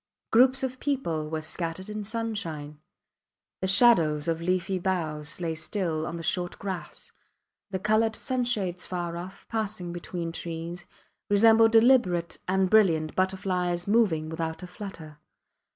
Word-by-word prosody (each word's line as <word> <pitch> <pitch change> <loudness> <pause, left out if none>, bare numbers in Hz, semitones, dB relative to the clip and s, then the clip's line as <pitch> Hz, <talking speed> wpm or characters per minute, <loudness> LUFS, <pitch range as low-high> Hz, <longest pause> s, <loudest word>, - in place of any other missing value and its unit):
Groups 255 +3 +5
of 255 -1 -3
people 170 - -2
were 160 0 -3
scattered 165 +3 -3
in 210 0 -5
sunshine. 195 -10 -4 0.8
The 190 - 0
shadows 170 -8 +4
of 165 0 -1
leafy 185 +2 0
boughs 160 -5 -1
lay 165 -2 -2
still 160 -1 -2
on 170 - -5
the 165 - -7
short 175 +1 -1
grass. 190 -3 -6 0.6
The 190 - -2
coloured 215 +3 +2
sunshades 230 -10 -1
far 175 -2 -3
off, 180 +3 -9
passing 210 -6 -3
between 175 -1 -5
trees, 170 +1 -5 0.4
resembled 225 +2 +6
deliberate 225 -8 +4
and 190 +1 +2
brilliant 175 -7 +3
butterflies 185 -2 0
moving 200 -8 +2
without 160 +1 -4
a - - -6
flutter. 175 -5 -9
180 Hz, 135 wpm, -27 LUFS, 165-215 Hz, 0.8 s, resembled